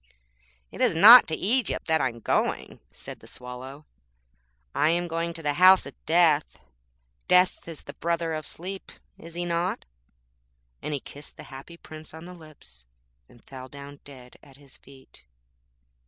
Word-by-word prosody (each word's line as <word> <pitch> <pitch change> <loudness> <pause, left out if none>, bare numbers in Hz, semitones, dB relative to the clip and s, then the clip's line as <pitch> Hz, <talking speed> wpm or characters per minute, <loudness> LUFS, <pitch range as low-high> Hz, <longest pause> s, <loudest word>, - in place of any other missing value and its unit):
'It - - -9
is - - +2
not 230 +9 +9
to 160 - -2
Egypt 230 +5 -1
that 160 -2 +1
I 130 - +1
am 115 -1 -13
going,' - - -2
said - - -10
the - - -17
Swallow. 130 +4 -10 0.9
I 150 - +2
am 175 +1 0
going 165 0 -3
to 165 - -9
the 145 -1 0
House 185 +4 +6
of - - -9
Death. 160 -3 +2 0.7
Death 180 -1 +3
is 165 -3 -9
the 140 - -10
brother 170 0 -2
of 155 -1 -5
Sleep, 190 +3 -8 0.3
is 165 0 -12
he 175 0 -3
not?' 175 +2 -2 1.0
And 150 - -3
he - - -4
kissed 145 +2 -13
the - - -10
Happy 140 +6 -11
Prince 155 -1 -12
on 160 +1 -11
the 180 - -10
lips, 140 - -16 0.4
and 120 - -21
fell 130 -1 -11
down 140 0 -11
dead 125 -3 -15
at 135 -1 -18
his 140 -2 -17
feet. 135 - -17
155 Hz, 170 wpm, -25 LUFS, 140-170 Hz, 1.0 s, not